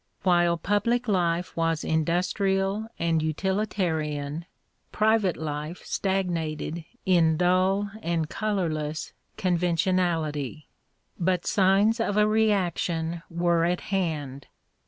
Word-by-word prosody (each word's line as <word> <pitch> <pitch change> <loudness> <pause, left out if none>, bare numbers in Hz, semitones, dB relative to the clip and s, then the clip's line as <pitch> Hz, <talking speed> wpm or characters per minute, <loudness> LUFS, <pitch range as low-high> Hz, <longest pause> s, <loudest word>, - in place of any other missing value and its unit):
While 175 -2 +3
public 210 +8 0
life 175 -3 0
was 165 -1 0
industrial 195 +5 0
and 165 -1 +1
utihtarian, 160 -4 -1 0.5
private 215 -4 +2
life 150 +2 -5
stagnated 170 -4 -2 0.2
in 165 -4 +4
dull 185 +3 +2
and 165 -3 -1
colourless 160 -7 -2 0.2
conventionality. 170 -5 0 0.5
But 180 0 +1
signs 200 +4 +3
of 210 -2 0
a 210 - +5
reaction 180 -6 0
were 170 0 +1
at 175 +1 0
hand. 150 -8 -2
175 Hz, 95 wpm, -26 LUFS, 160-195 Hz, 0.5 s, a